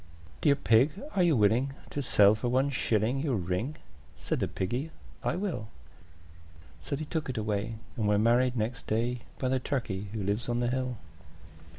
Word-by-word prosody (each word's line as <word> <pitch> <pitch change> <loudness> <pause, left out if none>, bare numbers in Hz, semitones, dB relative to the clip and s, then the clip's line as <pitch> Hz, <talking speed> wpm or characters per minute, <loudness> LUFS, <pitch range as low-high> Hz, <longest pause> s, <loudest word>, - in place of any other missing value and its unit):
III. 85 - -25 0.3
"Dear 145 -3 +5
Pig, 130 +1 +4 0.2
are 195 - +2
you 170 -4 +4
willing 115 +5 +3 0.2
to 145 - -2
sell 105 -5 +5
for 115 +3 -2
one 130 +3 +2
shilling 115 0 +1
Your 140 -3 0
ring?" 95 - -2 0.4
Said - - -2
the - - 0
Piggy, 120 +11 -2 0.3
"I - - 0
will." 180 - -3 1.1
So - - -3
they 155 +2 -4
took 155 -2 -3
it 125 - -3
away, 105 +1 -1 0.2
and 110 -3 0
were 105 0 +4
married 120 +4 +3
next 115 +2 -2
day 120 +3 0 0.2
By 130 - -1
the 130 0 +2
Turkey 115 -7 -2
who 110 -3 -3
lives 100 +5 -1
on 120 0 0
the 120 0 +1
hill. 130 -2 -2
120 Hz, 185 wpm, -29 LUFS, 110-135 Hz, 1.1 s, Dear